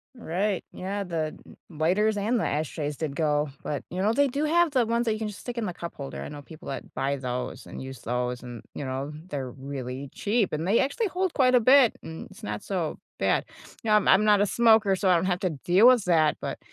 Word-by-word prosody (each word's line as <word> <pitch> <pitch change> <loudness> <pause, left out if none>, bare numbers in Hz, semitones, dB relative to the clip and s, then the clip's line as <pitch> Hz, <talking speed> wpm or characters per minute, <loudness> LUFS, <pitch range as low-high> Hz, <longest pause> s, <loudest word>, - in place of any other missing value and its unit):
Right. 195 -2 -1
Yeah. 200 +2 -4
The 160 -4 -3 0.3
lighters 185 +7 +1
and 225 +4 +1
the - - 0
ashtrays 150 -1 -2
did 150 -3 -3
go, 150 -2 +1
but, 145 -3 -3
you 185 +2 -3
know, 215 +3 +2
they 285 +1 +3
do 285 +4 -1
have 340 0 +3
the 250 -4 +3
ones 235 +1 0
that 220 - +2
you 215 - -4
can 220 - -2
just 210 - -8
stick 245 -1 -6
in 225 - -1
the 180 - -3
cup 170 -1 -7
holder. 140 -1 -6
I - - -6
know 145 0 -8
people 155 +2 -11
that 135 - -6
buy 140 +1 0
those 125 -1 -4
and - - -8
use 130 -2 -8
those 125 0 -2
and, 120 -2 -8
you 145 - -5
know, 135 +2 -3 0.2
they're 130 -3 -4
really 135 0 -6
cheap, 210 -4 0
and 160 +4 -2
they 215 - +4
actually 340 - 0
hold 370 0 -1
quite 255 -3 +4
a - - +7
bit 255 +1 +5
and 160 0 -8
it's - - -15
not 105 0 -4
so 175 -6 -2 0.2
bad. - - +2 0.4
You 220 - -2
know, 210 - +7
I'm 210 - +3
I'm 205 +3 +6
not 210 -1 +5
a 205 - +4
smoker, 220 -3 +4
so 190 0 +1
I 180 - +6
don't 170 - +1
have 180 -1 0
to 185 - +1
deal 180 - +4
with 245 -6 +5
that, 160 -4 +3
but - - -4
180 Hz, 250 wpm, -26 LUFS, 145-220 Hz, 0.4 s, a